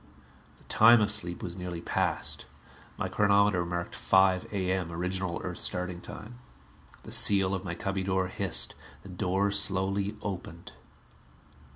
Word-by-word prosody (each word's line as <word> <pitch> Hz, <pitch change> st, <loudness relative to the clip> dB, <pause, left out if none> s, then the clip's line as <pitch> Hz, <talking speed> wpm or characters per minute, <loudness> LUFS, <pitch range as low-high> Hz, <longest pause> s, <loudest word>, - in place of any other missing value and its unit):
The -, -, -23 dB
time 115 Hz, +2 st, +6 dB
of 105 Hz, -1 st, +1 dB
sleep 90 Hz, -3 st, -4 dB
was 85 Hz, -, -5 dB
nearly 90 Hz, -2 st, -5 dB
passed. 85 Hz, -, -2 dB, 0.5 s
My -, -, -2 dB
chronometer 100 Hz, -3 st, +3 dB
marked 85 Hz, 0 st, -4 dB
five 95 Hz, -1 st, +3 dB
A.M. 95 Hz, -3 st, -1 dB
original 90 Hz, +1 st, -1 dB
Earth 90 Hz, -1 st, -5 dB
starting 90 Hz, -1 st, -3 dB
time. 120 Hz, +6 st, -10 dB, 0.6 s
The -, -, -10 dB
seal 95 Hz, -2 st, +4 dB
of 95 Hz, -, -3 dB
my 85 Hz, -3 st, -4 dB
cubby 95 Hz, +2 st, -3 dB
door 95 Hz, 0 st, 0 dB
hissed. -, -, 0 dB, 0.3 s
The 95 Hz, -, -11 dB
door 95 Hz, +2 st, 0 dB
slowly 100 Hz, +1 st, 0 dB
opened. 90 Hz, -4 st, -6 dB
95 Hz, 140 wpm, -29 LUFS, 90-100 Hz, 0.6 s, time